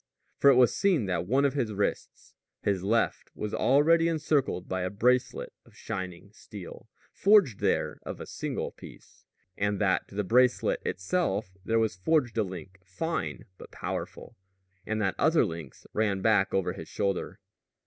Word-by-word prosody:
For 140 - +7
it 135 - +7
was 125 -1 +5
seen 180 - +2
that 90 -2 -2
one 135 +6 +3
of 140 - +2
his 120 -7 -1
wrists 100 0 -3 0.3
his 100 -3 0
left 110 +5 0
was 105 - -4
already 165 +5 +4
encircled 150 - 0
by 95 0 -2
a 90 - -1
bracelet 125 +6 +1
of - - -22
shining 95 +1 -6
steel, 100 -4 -11 0.2
forged 195 - +4
there - - 0
of - - -7
a - - -6
single - - -4
piece, - - -15 0.3
and 100 0 0
that 95 -3 +1
to - - -14
the 105 - 0
bracelet 125 +5 +3
itself 95 - -1
there 115 +3 +1
was 110 -2 +1
forged 120 - +1
a - - +3
link, 95 0 -8
fine 95 - -4
but - - -11
powerful, - - -6 0.5
and 110 0 -1
that 95 - +1
other 160 +2 +4
links 80 -5 -8
ran 100 -3 0
back 105 -3 +3
over 95 -2 0
his - - -9
shoulder. 100 -2 -2
105 Hz, 165 wpm, -28 LUFS, 95-135 Hz, 0.5 s, For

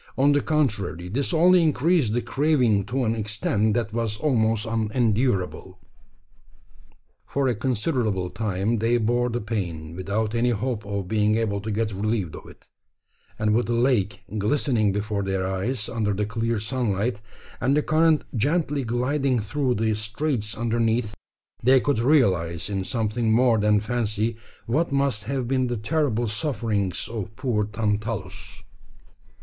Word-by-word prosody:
On 140 +2 +4
the 145 0 +3
contrary, 110 - -1
this 135 - -1
only 175 +2 +5
increased 155 -5 +2
the 120 0 0
craving 125 -7 +2
to 130 +1 -1
an 110 - +1
extent 110 0 0
that 115 -3 -1
was 115 -2 -1
almost 115 -7 +1
unendurable. 110 -4 0 1.5
For 140 -1 0
a 125 - +2
considerable 110 - -1
time 105 +1 -1
they 115 +2 +2
bore 120 +2 +1
the 120 0 -2
pain, 85 -7 -4
without 105 +4 -2
any 120 +1 +2
hope 115 0 -2
of 100 -2 -3
being 105 +1 +2
able 100 -3 -1
to 110 - -5
get 110 0 -1
relieved 100 -3 -2
of - - -11
it; - - -17 0.7
and 105 0 +1
with 120 +2 +1
the 120 - 0
lake 120 -3 +1 0.2
glistening 110 -1 +1
before 105 +1 -2
their 95 -1 -1
eyes 105 +5 -2
under 105 -3 -1
the 105 +1 0
clear 115 +1 -1
sunlight, 110 0 -1 0.4
and 135 +4 +2
the 150 - +2
current 155 0 +3
gently 145 +3 0
gliding 125 +2 0
through 125 +4 -1
the 110 +1 +1
straits 110 +1 -2
underneath, 115 -1 0 0.5
they 130 +2 +5
could 140 -2 0
realise, 100 - +2
in 95 -1 -1
something 110 +1 -1
more 115 0 +4
than 105 0 +3
fancy, 110 0 -1 0.3
what 150 +7 0
must 140 -7 +1
have 130 0 -2
been 130 0 +1
the 120 -1 -2
terrible 120 0 0
sufferings 110 - -1
of 110 -2 -6
poor 120 -5 0
Tantalus. 105 -1 -3
115 Hz, 150 wpm, -24 LUFS, 105-125 Hz, 1.5 s, only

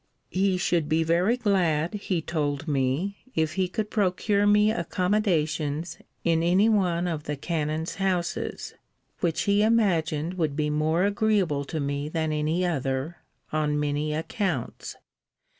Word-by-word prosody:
He 190 0 +2
should 170 -3 0
be 160 +1 +2
very 175 +9 +2
glad, 175 -8 +1
he 190 -5 -2
told 150 -1 -2
me, 145 +8 0 0.2
if 160 -1 +1
he 190 0 0
could 210 +3 -3
procure 205 +1 +1
me 210 +1 +5
accommodations 170 -5 -1 0.2
in 165 -1 +2
any 180 +5 +4
one 180 -5 +2
of 160 -3 -3
the 150 - -2
canon's 155 +1 -2
houses; 185 -3 -2 0.5
which 170 0 0
he 200 0 +3
imagined 180 -6 +1
would 155 -4 0
be 150 0 0
more 155 +4 +1
agreeable 200 -8 +1
to 160 +2 -4
me 140 +1 -2
than 160 -1 -1
any 155 +4 0
other, 140 0 -2 0.4
on 150 -1 +1
many 150 +1 -1
accounts. 160 - -3
170 Hz, 140 wpm, -26 LUFS, 150-190 Hz, 0.5 s, me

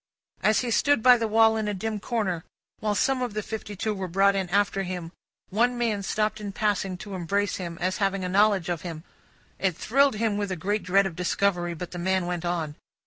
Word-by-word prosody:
As 215 0 +3
he 245 -2 -2
stood 260 +1 +3
by 250 -1 +8
the 230 -1 -1
wall 225 +1 +5
in 215 -1 -1
a 210 - -1
dim 215 +2 -3
corner, 195 -7 -2 0.4
while 210 -1 0
some 265 +4 +1
of 240 -4 -3
the 215 - -2
fifty 210 -1 -6
two 215 +3 -1
were 190 -2 -4
brought 195 +3 +3
in 190 -2 -1
after 200 +1 +1
him, 180 -3 -5 0.4
one 240 +5 +2
man 225 -4 0
stopped 215 +2 -1
in 200 -1 -5
passing, 195 -3 0
to 200 +2 -8
embrace 200 +3 -1
him, 170 -3 -6
as 185 +2 -1
having 195 -1 0
a - - -1
knowledge 200 -1 +3
of 175 -3 -2
him. 165 -3 -7 0.6
It 185 -4 0
thrilled 275 +1 +3
him 215 -1 0
with 205 -2 -2
a - - -1
great 205 +5 -1
dread 190 +2 +3
of 185 -4 -4
discovery; 180 -1 0
but 175 +1 -7
the 175 - -6
man 185 0 +1
went 175 -1 -3
on. 165 -4 -2
200 Hz, 225 wpm, -26 LUFS, 180-215 Hz, 0.6 s, by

